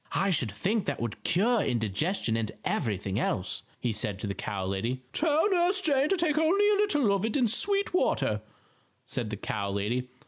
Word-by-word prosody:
"I 195 0 +2
should 125 - +1
think 195 - -1
that - - -1
would 115 -2 -4
cure 210 +7 +2
indigestion 115 - 0
and 110 -2 -1
everything 100 -2 -1
else," 95 0 -1 0.2
he 120 - -1
said 105 -2 -2
to - - -3
the 100 - -2
cow 95 -1 -4
lady. 115 +7 -2
"Tell 315 +3 +2
Nurse 365 +2 +3
Jane 290 -5 +2
to 390 - +2
take 310 -3 +1
only 380 +6 +3
a 410 - +3
little 295 - +2
of 200 0 0
it 225 +4 0
in 250 -4 +3
sweet 400 - +1
water," 105 - +1 0.6
said 120 -4 -3
the 105 - -4
cow 100 0 -3
lady. 110 +6 -2
175 Hz, 195 wpm, -28 LUFS, -, 0.6 s, Nurse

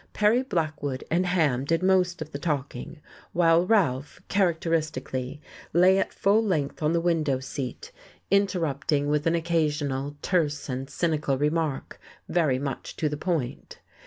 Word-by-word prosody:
Perry 215 +4 +3
Blackwood 155 - -2
and 180 +2 +2
Ham 155 -8 +2
did 165 +5 0
most 185 -2 +2
of 155 - -17
the 140 - -5
talking, 150 0 -3 0.3
while 170 0 +4
Ralph, 150 - +1
characteristically, 160 -7 -1 0.3
lay 185 +3 +5
at - - -1
full 205 +3 +2
length 160 -10 -1
on 155 0 +2
the 170 - +3
window 160 -6 +1
seat, 130 -1 -6 0.4
interrupting 160 -7 +1
with 150 +1 +1
an 165 - +3
occasional 150 -4 -1
terse 150 -5 0
and 130 +1 -4
cynical 150 -5 0
remark 150 0 -1 0.3
very 155 -7 +2
much 135 0 -5
to 155 - 0
the 150 - -3
point. 150 -6 -3
155 Hz, 140 wpm, -26 LUFS, 140-175 Hz, 0.4 s, lay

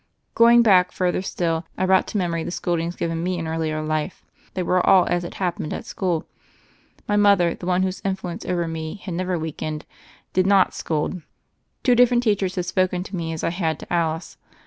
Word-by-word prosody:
Going 235 +1 +6
back 185 -5 +5
further 180 0 0
still, 165 -3 -2
I 185 - +1
brought 190 0 +3
to - - -3
memory 170 -3 -1
the - - -4
scoldings 170 -1 -2
given 165 -1 -2
me 180 +1 -1
in 165 -1 -4
earlier 160 -1 -2
life. 155 +3 -3 0.3
They 185 - -1
were 180 +1 +2
all 185 -2 +6
as 175 0 0
it 175 - -7
happened 175 -4 -2
at - - -6
school: 175 -5 -2 0.8
my 205 - +1
mother, 200 -4 +4
the 175 - -8
one 185 0 +2
whose 190 0 -2
influence 190 -3 -3
over 175 -2 -1
me 160 0 -5
had 195 -3 -7
never 180 +1 -1
weakened, 155 -1 -5 0.5
did 185 0 +2
not 195 -1 +4
scold. 160 +3 -2 0.6
Two 250 - +4
different 245 0 +4
teach 210 -4 +2
ers 185 -1 -1
had 180 - -2
spoken 180 0 0
to 190 - -7
me 165 -2 -3
as 160 - -5
I 165 - +1
had 165 -4 -1
to - - -7
Alice. 165 -1 -1
180 Hz, 205 wpm, -23 LUFS, 165-190 Hz, 0.8 s, Going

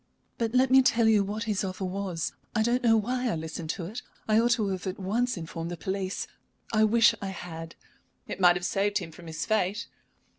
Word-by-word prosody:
"But 230 +1 -1
let 255 0 +4
me 265 0 +8
tell 235 -3 +3
you 215 -2 +5
what 210 +3 -3
his 210 -4 -1
offer 190 0 -3
was. 185 -3 -3 0.2
I 220 - +3
don't 240 +2 +1
know 225 -2 +5
why 245 +3 0
I - - 0
listened 160 0 -5
to 175 - -5
it. 220 +8 -6 0.3
I 215 0 +4
ought 235 +1 +3
to 215 -4 0
have 190 -1 -3
at 185 - -3
once 225 +5 0
informed 165 0 -5
the 175 - -5
police. 190 +2 -3 0.5
I 215 0 +5
wish 225 0 +5
I 200 - -3
had." 165 -3 -7 0.5
"It - - -5
might 175 -1 +7
have 180 0 -3
saved 200 +2 +1
him 175 -4 -5
from 170 +1 -13
his 160 0 -4
fate." 215 0 0
200 Hz, 220 wpm, -28 LUFS, 180-225 Hz, 0.5 s, me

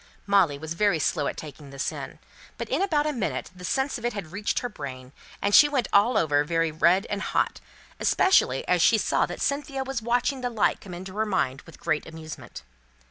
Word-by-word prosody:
Molly 195 -8 +3
was 160 +2 -5
very 200 0 +2
slow 150 -1 0
at - - -4
taking 145 -1 -9
this 135 0 -2
in; - - -8 0.4
but - - -4
in - - 0
about 310 -7 +2
a 305 - 0
minute 230 -7 -3
the 180 - -12
sense 265 +7 -1
of - - -14
it 240 - -1
had 195 -6 -6
reached 205 +2 -2
her 245 - -2
brain, 130 - -8 0.3
and 200 - +1
she 295 +6 +8
went 265 -6 0
all 215 +4 +5
over 145 -4 +3
very 165 +1 0
red 175 +6 +3
and 205 0 -3
hot; - - -1 0.4
especially 380 - +3
as - - +3
she - - +5
saw - - +1
that - - -7
Cynthia 280 -1 -1
was 265 -3 -3
watching 245 +3 0
the 245 - -1
light 225 -3 +1
come 180 -3 -8
into 185 +3 -8
her 220 - +1
mind 140 -9 0
with 165 - -14
great 155 - -1
amusement. 160 - -9
195 Hz, 215 wpm, -26 LUFS, 155-245 Hz, 0.4 s, she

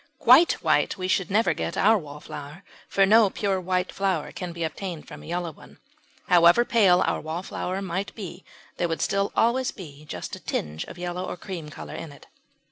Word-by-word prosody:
Quite 265 +7 +7
white - - +2
we 185 -1 -3
should 190 -1 +1
never 215 +4 +3
get - - -4
our 220 +3 +5
Wallflower, 150 0 -7 0.2
for 195 - +3
no 215 +1 +6
pure 195 -1 -1
white 180 0 -1
flower 190 -5 -1
can 180 -2 -6
be 170 0 -5
obtained 165 +1 -5
from - - -10
a - - -12
yellow 175 0 -2
one. - - -17 0.5
However 175 +7 +6
pale 190 -7 +4
our - - -1
Wallflower 180 +4 -4
might 190 +1 -3
be 185 -3 -8 0.3
there 175 - +1
would 165 -1 -2
still 200 0 0
always 250 +3 +2
be 150 -6 -10
just 90 - -6
a - - -11
tinge 75 +1 -3
of - - -11
yellow 175 +1 -4
or - - -5
cream 175 -4 -7
colour - - -9
in 160 - -7
it. 140 - -15
180 Hz, 195 wpm, -25 LUFS, 165-195 Hz, 0.5 s, Quite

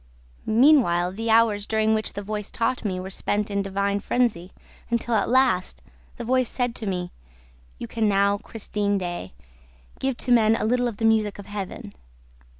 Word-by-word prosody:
Meanwhile, 220 - +4
the 225 +4 -4
hours 220 -2 +3
during 220 0 +2
which 220 0 -2
the 205 - -5
voice 210 0 -4
taught 235 +2 -1
me 190 -4 -2
were 190 +1 -6
spent 210 +2 -2
in 200 - 0
a - - +2
divine 200 +1 -1
frenzy, 205 -7 0 0.4
until, 235 0 -1
at 210 -3 +1
last, 250 -8 +2 0.3
the 235 - -6
voice 255 0 +2
said 245 -2 -1
to 220 - -5
me, 180 -2 -3 0.7
'You - - -6
can 220 - 0
now, 200 0 +2
Christine 205 -2 -2
Daae, 175 - -5 0.7
give 265 -2 -1
to 250 - -3
men 225 -2 +5
a 225 - -1
little 245 +2 +1
of 225 -4 -5
the 225 - -1
music 220 -2 +2
of 200 - -9
Heaven.' 195 - -7
215 Hz, 180 wpm, -24 LUFS, 200-230 Hz, 0.7 s, men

